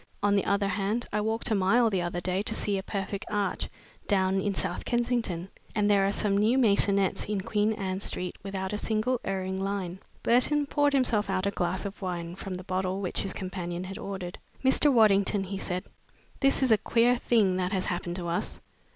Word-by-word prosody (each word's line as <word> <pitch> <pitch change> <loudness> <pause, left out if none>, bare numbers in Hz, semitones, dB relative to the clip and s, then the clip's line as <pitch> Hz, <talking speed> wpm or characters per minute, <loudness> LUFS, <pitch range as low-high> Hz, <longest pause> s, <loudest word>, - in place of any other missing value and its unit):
On 205 0 +4
the 200 - +2
other 200 0 +1
hand, 205 +5 -1
I 210 - +1
walked 225 +2 -1
a - - +4
mile 215 +4 +3
the 190 -3 +1
other 175 0 -2
day 185 +2 0
to 220 +1 -1
see 205 - 0
a - - -3
perfect 195 0 -4
arch 205 -2 -1 0.4
down 190 -1 +2
in 200 0 -1
South 175 - -2
Kensington, 235 -7 -1 0.3
and 210 -2 +2
there 195 -1 +4
are - - +1
some 205 -1 0
new 215 +5 +3
maisonettes 200 -5 +2
in 205 -2 0
Queen 215 +1 +1
Anne 190 -3 -3
Street 180 -2 -3
without 195 0 -4
a 210 - 0
single 230 +4 0
erring 190 -1 -2
line." 190 -2 -3 0.2
Burton 285 +5 +3
poured 290 0 +2
himself 235 -7 +1
out 190 0 0
a 200 - +1
glass 185 0 -1
of 200 +1 -6
wine 175 -2 -4
from 190 -1 -5
the 180 - -7
bottle 185 0 -1
which 190 -3 -2
his 195 - -3
companion 185 -2 -4
had 190 +1 -7
ordered. 190 -3 -5 0.3
"Mr. 275 +2 +5
Waddington," 205 -4 +4
he 195 +1 -5
said, 180 -1 -2 0.6
"this 275 0 +3
is 255 - +3
a 220 - +6
queer 235 +3 +3
thing 215 -6 +2
that 180 0 -1
has 190 -2 0
happened 175 -1 -2
to 175 -2 -3
us." 170 +1 -2
195 Hz, 205 wpm, -28 LUFS, 185-215 Hz, 0.6 s, a